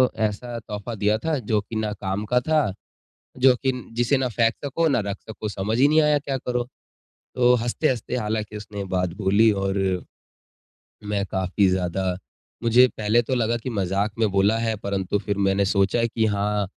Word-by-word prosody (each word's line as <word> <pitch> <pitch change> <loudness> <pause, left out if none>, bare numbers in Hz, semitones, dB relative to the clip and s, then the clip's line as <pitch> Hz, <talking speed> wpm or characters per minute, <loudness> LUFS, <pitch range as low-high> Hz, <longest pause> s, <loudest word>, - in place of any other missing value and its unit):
ऐसा 110 +2 -2
तोहफ़ा 105 +1 -6
दिया 105 +1 +1
था 160 -2 +1
जो 110 -2 0
की 105 +2 -9
ना 110 -1 -1
काम 95 +1 -2
का 125 - +5
था, 155 -8 +1 0.6
जो 130 0 +5
कि 130 +1 0 0.2
जिसे 120 +3 +2
ना 130 - 0
फेंक 115 0 +2
सको 165 +4 +1
ना 135 - +2
रख 100 0 -3
सको 110 -1 -5
समझ 105 +3 -2
ही 140 - +6
नहीं 155 +2 +4
आया 150 -1 +3
क्या 140 -2 -3
करो?" 125 -1 -2 0.7
तो 125 -1 +5
हँसते-हँसते 120 +1 -1
हालाँकि 105 -1 -3
उसने 105 -1 -6
बात 90 -2 0
बोली 105 +2 +4
और, 95 -2 -1 1.0
मैं 105 -1 -1
काफ़ी 95 +1 +1
ज़्यादा 90 0 -1 0.5
मुझे 120 +2 +6
पहले 110 +3 +2
तो 130 +2 -2
लगा 120 -1 +1
कि 125 +2 -5
मज़ाक 100 0 -1
में 110 -2 +2
बोला 100 +3 +3
है 115 -1 0
परंतु 100 0 -2
फिर 100 0 -3
मैंने 100 0 +2
सोचा 100 +4 +2
कि 110 -1 0
हाँ, 105 0 0
110 Hz, 180 wpm, -24 LUFS, 100-120 Hz, 1.0 s, ही